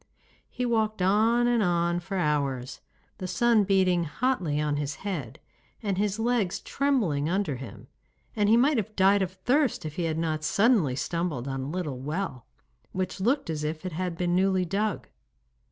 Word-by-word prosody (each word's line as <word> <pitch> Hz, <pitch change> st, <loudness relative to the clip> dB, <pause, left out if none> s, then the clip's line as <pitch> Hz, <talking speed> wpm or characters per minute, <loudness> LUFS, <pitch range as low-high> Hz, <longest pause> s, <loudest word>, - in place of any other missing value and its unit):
He 250 Hz, -, -3 dB
walked 220 Hz, -3 st, 0 dB
on 220 Hz, +5 st, +3 dB
and 240 Hz, -1 st, +2 dB
on 175 Hz, -2 st, +1 dB
for 190 Hz, +2 st, -5 dB
hours, 140 Hz, -6 st, -1 dB, 0.4 s
the 185 Hz, -, -4 dB
sun 230 Hz, +2 st, +3 dB
beating 185 Hz, -3 st, +2 dB
hotly 170 Hz, -, -1 dB
on 150 Hz, -1 st, 0 dB
his 145 Hz, 0 st, -3 dB
head, 155 Hz, -, -4 dB, 0.4 s
and 200 Hz, -3 st, 0 dB
his 205 Hz, 0 st, 0 dB
legs 225 Hz, -5 st, 0 dB
trembling 210 Hz, -, 0 dB
under 180 Hz, -7 st, 0 dB
him, 125 Hz, -5 st, -10 dB, 0.5 s
and 210 Hz, -1 st, +2 dB
he 225 Hz, -, +6 dB
might 275 Hz, +3 st, +3 dB
have 215 Hz, 0 st, -3 dB
died 195 Hz, +1 st, +4 dB
of 185 Hz, -1 st, -2 dB
thirst 250 Hz, -, +1 dB
if 155 Hz, -1 st, -6 dB
he 175 Hz, -, 0 dB
had 160 Hz, -1 st, -1 dB
not 160 Hz, -1 st, -1 dB
suddenly 200 Hz, -, +3 dB
stumbled 165 Hz, -4 st, -2 dB
on 135 Hz, -1 st, -3 dB
a 135 Hz, -, -4 dB
little 155 Hz, -6 st, -3 dB
well, 150 Hz, -2 st, -4 dB, 0.5 s
which 185 Hz, 0 st, -3 dB
looked 270 Hz, +8 st, +1 dB
as 150 Hz, -1 st, -3 dB
if 155 Hz, +3 st, -4 dB
it 185 Hz, -, -3 dB
had 175 Hz, +1 st, -3 dB
been 175 Hz, 0 st, 0 dB
newly 190 Hz, 0 st, +2 dB
dug. 200 Hz, +2 st, -2 dB
185 Hz, 175 wpm, -27 LUFS, 155-215 Hz, 0.5 s, he